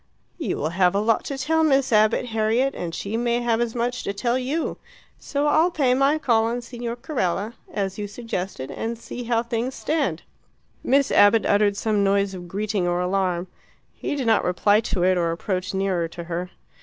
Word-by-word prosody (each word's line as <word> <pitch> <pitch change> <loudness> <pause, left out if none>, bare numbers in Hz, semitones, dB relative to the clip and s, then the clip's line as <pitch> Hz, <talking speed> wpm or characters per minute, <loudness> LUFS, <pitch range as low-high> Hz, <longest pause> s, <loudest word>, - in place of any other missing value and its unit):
"You - - -2
will 155 - -1
have 180 +1 +2
a - - +3
lot 220 +2 +1
to 275 - -4
tell 320 +3 +1
Miss 270 -5 +2
Abbott, 215 +3 +3
Harriet, 225 +5 +1
and 170 -1 -5
she 210 +3 -3
may 240 0 +1
have 235 -1 +1
as 235 -1 -2
much 245 +1 -1
to 200 - -3
tell 235 +4 0
you. 265 +6 -2 0.4
So 285 0 -2
I'll 315 +4 +4
pay 275 -7 +2
my 275 +4 +3
call 235 -7 +2
on 235 +2 -2
Signor 240 -1 -5
Carella, 230 - -2 0.2
as 195 -1 -3
you 205 - -3
suggested, 195 - -5
and 225 - -4
see 240 +1 -7
how 230 -1 +1
things 235 +2 -2
stand." 280 - -1 0.6
Miss 275 +1 +2
Abbott 210 +2 +5
uttered 205 0 +3
some 210 -1 +1
noise 200 0 +2
of 175 -1 -8
greeting 200 0 -1
or 175 0 0
alarm. 180 -1 0 0.5
He - - -4
did 270 -3 -2
not 225 -1 +3
reply 205 +3 +3
to 205 -5 -1
it 185 0 +3
or 170 -1 +1
approach 185 +3 -2
nearer 190 -3 0
to 170 +1 -8
her. 175 +1 -4
220 Hz, 195 wpm, -23 LUFS, 190-245 Hz, 0.6 s, Abbott